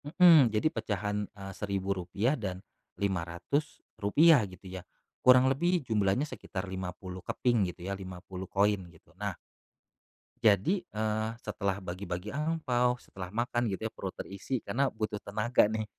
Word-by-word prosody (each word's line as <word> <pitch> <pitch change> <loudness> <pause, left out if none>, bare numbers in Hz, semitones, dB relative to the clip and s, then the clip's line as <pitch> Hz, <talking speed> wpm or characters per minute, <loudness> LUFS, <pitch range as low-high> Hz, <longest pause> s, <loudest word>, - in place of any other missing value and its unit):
Mhm, 155 -3 +7
jadi 110 +6 +1
pecahan, 105 0 -2
eee, 95 -1 -9
Rp1.000 100 +3 -1
dan 95 -9 -4 0.4
Rp500 100 - +2
gitu 95 +1 -14
ya, 95 0 -6 0.4
kurang 130 0 +7
lebih 165 +4 +2
jumlahnya 105 +3 +2
sekitar 100 -9 -6
50 95 0 -6
keping 115 -1 +1
gitu 90 0 -9
ya, 100 - -2
50 95 -1 -7
koin 100 0 +2
gitu 85 +1 -21
nah 95 -1 -4 1.0
jadi, 115 - +4
eee, 110 -8 -2 0.2
setelah 100 -2 -1
bagi-bagi 90 +1 -5
angpao, 140 -5 +1
setelah 95 -6 -9
makan 120 +2 0
gitu 100 +3 -3
perut 95 - -4
terisi 100 +7 -4
karena 135 +2 +1
butuh 110 -2 -4
tenaga 105 +1 +2
nih 110 0 -2
105 Hz, 130 wpm, -30 LUFS, 95-125 Hz, 1.0 s, Mhm